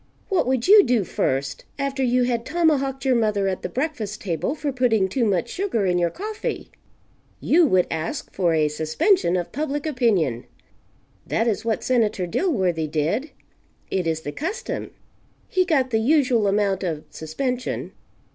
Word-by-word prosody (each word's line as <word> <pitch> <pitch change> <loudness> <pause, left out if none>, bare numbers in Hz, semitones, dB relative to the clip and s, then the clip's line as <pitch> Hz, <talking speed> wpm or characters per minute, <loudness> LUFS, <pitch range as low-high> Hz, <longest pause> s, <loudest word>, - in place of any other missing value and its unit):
What 380 - +1
would 255 -2 0
you 415 +1 +9
do 240 - +2
first, 135 -5 -2
after 275 -1 -2
you 250 -1 +2
had 240 -2 0
tomahawked 275 -4 0
your 260 - +4
mother 210 -4 +1
at 190 -1 -2
the - - -4
breakfast 245 -7 -3
table 190 - -2
for 295 -2 -2
putting 230 -6 +2
too 240 +6 -1
much 195 -6 +1
sugar 365 - -1
in 180 -1 +2
your 170 -1 +2
coffee? 425 - -5 0.7
You 330 0 +4
would 185 -7 +3
"ask 165 - -4
for 175 -4 +1
a 155 -1 +3
suspension 170 - +1
of 175 - -4
public 290 +1 -3
opinion." 205 - +1 0.8
That 225 - 0
is 220 -1 0
what 225 -2 -1
Senator 220 -7 +1
Dilworthy 180 - 0
did. 165 - -1 0.6
It 185 -3 0
is 160 -1 -1
the 145 - -5
custom. 395 - -4 0.6
He 370 0 +1
got 270 -7 +1
the 220 - +2
usual 250 -4 +3
amount 200 -1 +1
of 160 -5 -3
suspension. 250 - -3
230 Hz, 160 wpm, -23 LUFS, 180-280 Hz, 0.8 s, you